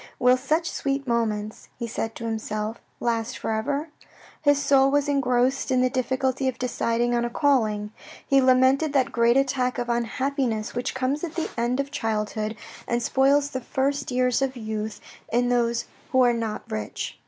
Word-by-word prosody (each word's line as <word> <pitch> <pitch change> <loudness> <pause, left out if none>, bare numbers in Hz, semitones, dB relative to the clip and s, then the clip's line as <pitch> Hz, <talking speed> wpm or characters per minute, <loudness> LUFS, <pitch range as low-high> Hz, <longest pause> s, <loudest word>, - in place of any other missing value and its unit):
" - - -29
Will 250 0 +5
such 305 +6 0
sweet 275 0 -2
moments 215 -3 -1
" - - -39
he 235 - -3
said 225 -1 -4
to 230 - -6
himself 220 0 -3
" - - -40
last 230 0 -1
for - - -3
ever? 280 +8 -1 0.3
" - - -23
His 290 -2 +4
soul 275 -1 +4
was 290 +1 +2
engrossed 265 -2 +1
in 255 -1 +3
the 255 0 +2
difficulty 260 +1 0
of 255 -2 -1
deciding 240 -1 0
on 240 0 +1
a 240 - -1
calling. 220 -7 +1 0.3
He 275 -1 +4
lamented 260 +3 +4
that 270 -1 +2
great 235 +1 +3
attack 255 -2 +1
of 240 -1 -3
unhappiness 235 -1 -1
which 245 +2 -3
comes 265 +4 -1
at 335 -2 -4
the 330 - -2
end 240 +2 0
of 280 0 -2
childhood 215 -4 -2 0.3
and 235 0 0
spoils 280 +3 +3
the 260 - -3
first 275 +3 -1
years 250 0 +1
of 265 -1 -1
youth 215 -1 -4 0.3
in 245 +1 +2
those 235 -1 +1 0.3
who 260 - +4
are 245 -1 +4
not 225 -2 -3
rich. 105 -1 -5
250 Hz, 190 wpm, -25 LUFS, 230-275 Hz, 0.3 s, Will